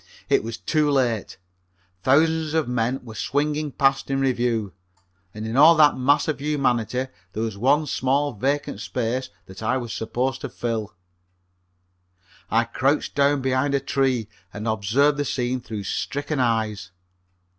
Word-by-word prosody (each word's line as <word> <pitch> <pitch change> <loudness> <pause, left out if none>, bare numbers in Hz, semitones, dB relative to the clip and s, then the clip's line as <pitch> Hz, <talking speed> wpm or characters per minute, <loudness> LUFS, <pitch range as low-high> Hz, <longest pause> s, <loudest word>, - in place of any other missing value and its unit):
It - - +3
was 115 0 -5
too 155 -2 +1
late. 125 -9 0 0.6
Thousands 160 - +2
of 160 -4 +1
men 125 +2 -1
were 110 - -9
swinging 150 +6 -1
past 135 0 +1
in 135 0 0
review, 120 -6 0 0.6
and 110 +2 -7
in 110 +1 -3
all 155 +5 +8
that 150 -2 +5
mass 145 +4 +2
of 155 -3 -2
humanity 130 -5 0 0.3
there 110 - -2
was 110 -3 -3
one 140 +8 +2
small 140 +1 0
vacant 135 0 -1
place 125 +1 -1 0.2
that 95 +2 -11
I 120 +4 +1
was 120 -4 -5
supposed 125 +5 -2
to - - -4
fill. 110 -3 -4 1.5
I - - +3
crouched - - 0
down 140 -1 +2
behind 130 +2 +1
a - - +2
tree 135 -4 0 0.2
and 105 +4 -6
observed 115 +8 +2
the - - +2
scene 125 -1 -1
through 110 -3 -6
stricken 145 +8 -3
eyes. 110 -4 0
130 Hz, 150 wpm, -23 LUFS, 115-145 Hz, 1.5 s, all